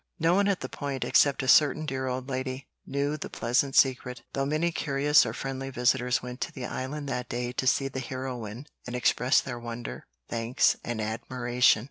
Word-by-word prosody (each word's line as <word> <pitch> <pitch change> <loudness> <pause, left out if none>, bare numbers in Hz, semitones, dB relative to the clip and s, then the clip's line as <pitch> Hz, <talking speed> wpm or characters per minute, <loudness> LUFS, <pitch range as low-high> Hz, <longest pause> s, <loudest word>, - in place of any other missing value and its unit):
No 165 0 +3
one 200 +2 +3
at 200 -2 0
the - - -3
Point, 140 -3 -4
except 140 -2 +3
a - - -3
certain 150 +3 +5
dear 130 -3 -2
old 130 0 -3
lady, 130 0 -4 0.2
knew 140 +2 -1
the - - -6
pleasant 130 +3 0
secret, 125 -2 +2
though 135 0 0
many 155 +4 +1
curious 145 -1 +3
or - - -2
friendly 135 0 -4
visitors 125 -1 +1
went 125 +1 -7
to - - -2
the 130 - -6
Island 140 +4 -4
that 125 -2 -3
day 120 0 -2
to 130 +1 -2
see 135 +2 +3
the 135 0 -5
heroine 130 -2 -5 0.2
and 125 - -4
express 125 +2 +3
their 120 -2 -6
wonder, 120 0 -7 0.2
thanks, 115 +1 +2
and 120 -2 -3
admiration. 120 +2 +2
130 Hz, 190 wpm, -28 LUFS, 125-140 Hz, 0.2 s, certain